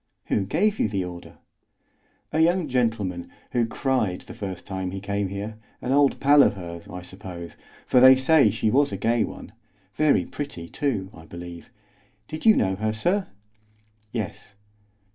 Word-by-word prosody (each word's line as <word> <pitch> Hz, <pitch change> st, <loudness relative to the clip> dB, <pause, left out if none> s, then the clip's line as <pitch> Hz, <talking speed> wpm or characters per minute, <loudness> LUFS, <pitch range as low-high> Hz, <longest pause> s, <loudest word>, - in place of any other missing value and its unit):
"Who 100 Hz, -, +1 dB
gave 205 Hz, -, +1 dB
you -, -, +2 dB
the 95 Hz, -3 st, -1 dB
order?" 90 Hz, -1 st, -9 dB, 1.0 s
"A 155 Hz, -, +1 dB
young 170 Hz, +1 st, +3 dB
gentleman, 110 Hz, -9 st, -1 dB, 0.2 s
who 120 Hz, -2 st, +1 dB
cried 115 Hz, -7 st, -1 dB
the -, -, -11 dB
first 95 Hz, -4 st, -6 dB
time 95 Hz, -1 st, -3 dB
he 95 Hz, +1 st, -5 dB
came 100 Hz, 0 st, -2 dB
here; 100 Hz, +3 st, -5 dB, 0.2 s
an 125 Hz, -, -3 dB
old 140 Hz, 0 st, +3 dB
pal 145 Hz, +1 st, +6 dB
of -, -, +4 dB
hers, 85 Hz, -2 st, -8 dB
I 90 Hz, 0 st, -7 dB
suppose, 90 Hz, -2 st, -9 dB, 0.3 s
for 125 Hz, -, +4 dB
they 130 Hz, +1 st, +9 dB
say 135 Hz, -2 st, +5 dB
she 110 Hz, +1 st, 0 dB
was 140 Hz, +1 st, +3 dB
a 100 Hz, -, -3 dB
gay 115 Hz, +3 st, +2 dB
one. -, -, -7 dB, 0.4 s
Very 155 Hz, +4 st, +3 dB
pretty, 140 Hz, -, -6 dB
too, 110 Hz, -10 st, -2 dB
I 80 Hz, 0 st, -13 dB
believe. 85 Hz, 0 st, -9 dB, 0.6 s
Did 155 Hz, +8 st, -4 dB
you 220 Hz, -, +8 dB
know 95 Hz, -2 st, +1 dB
her, 110 Hz, +1 st, -1 dB
sir?" 180 Hz, -, 0 dB, 0.8 s
"Yes." 110 Hz, -2 st, -5 dB
110 Hz, 165 wpm, -25 LUFS, 95-135 Hz, 1.0 s, they